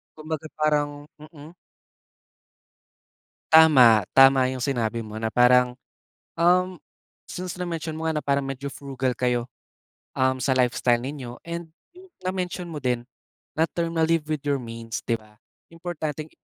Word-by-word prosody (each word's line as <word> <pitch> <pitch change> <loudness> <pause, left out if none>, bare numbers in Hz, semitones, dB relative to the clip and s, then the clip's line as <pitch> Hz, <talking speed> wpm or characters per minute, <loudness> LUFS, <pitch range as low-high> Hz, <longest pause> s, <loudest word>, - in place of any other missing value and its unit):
'Kumbaga 155 0 -5
parang 145 -1 0
mm. 155 +1 -13 2.0
Tama, 130 -10 +7
tama 135 -1 +7
yung 130 -1 -4
sinabi 115 -4 -1
mo 110 +1 -7
na 110 - -1
parang, 125 +1 +4 0.6
um, 180 +1 +3 0.5
since 180 0 -6
na-mention 165 -3 -4
mo 160 0 -3
nga 160 -1 0
na - - -28
parang 140 -1 0
medyo 135 +1 -5
frugal 135 -2 -3
kayo, 125 -1 0 0.7
um, 130 0 +1
sa 130 +1 +1
lifestyle 125 -1 +2
ninyo, 130 -2 -7
and 170 -1 -6 0.5
na-mention 180 -1 -3
mo 155 -3 -5
din 125 -2 -1 0.5
na 160 - +4
term 170 -1 -3
ma 160 - +4
live 165 -2 +1
with 155 -3 -2
your 140 -2 0
means, 115 -1 -6
'di 115 - 0
ba? 105 -1 -21 0.4
Importanteng 160 -3 -5
140 Hz, 140 wpm, -24 LUFS, 125-160 Hz, 2.0 s, Tama